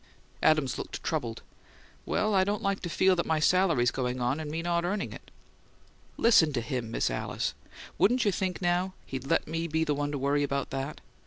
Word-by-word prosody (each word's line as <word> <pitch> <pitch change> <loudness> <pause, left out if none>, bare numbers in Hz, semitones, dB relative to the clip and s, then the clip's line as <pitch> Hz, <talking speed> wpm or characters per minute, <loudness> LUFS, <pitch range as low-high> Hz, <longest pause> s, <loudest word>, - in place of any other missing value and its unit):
Adams 150 -5 +3
looked - - -6
troubled. 120 -8 -3 0.6
"Well, 215 0 +1
I 190 -1 +5
don't 205 +1 -2
like 200 0 0
to 175 - -5
feel 190 +3 +3
that 170 - -1
my 160 -1 +2
salary's 160 -8 +3
going 125 -1 -2
on 125 +4 0
with 155 - -5
me 160 +2 -3
not 170 0 0
earning 195 +3 -2
it." - - -12 0.9
"Listen 195 -9 +5
to 120 - 0
him, 115 0 -3
Miss 115 - 0
Alice! - - -2 0.5
Wouldn't 245 +3 +3
you 205 - +4
think, 185 -1 -2
now, 180 +2 +1
he'd 135 0 -6
let - - +1
me 165 +1 -2
be 160 0 0
the 150 - +1
one 145 0 -2
to 145 - -2
worry 140 +2 +1
about 140 -1 -1
that? 135 +3 -4
155 Hz, 200 wpm, -29 LUFS, 135-185 Hz, 0.9 s, I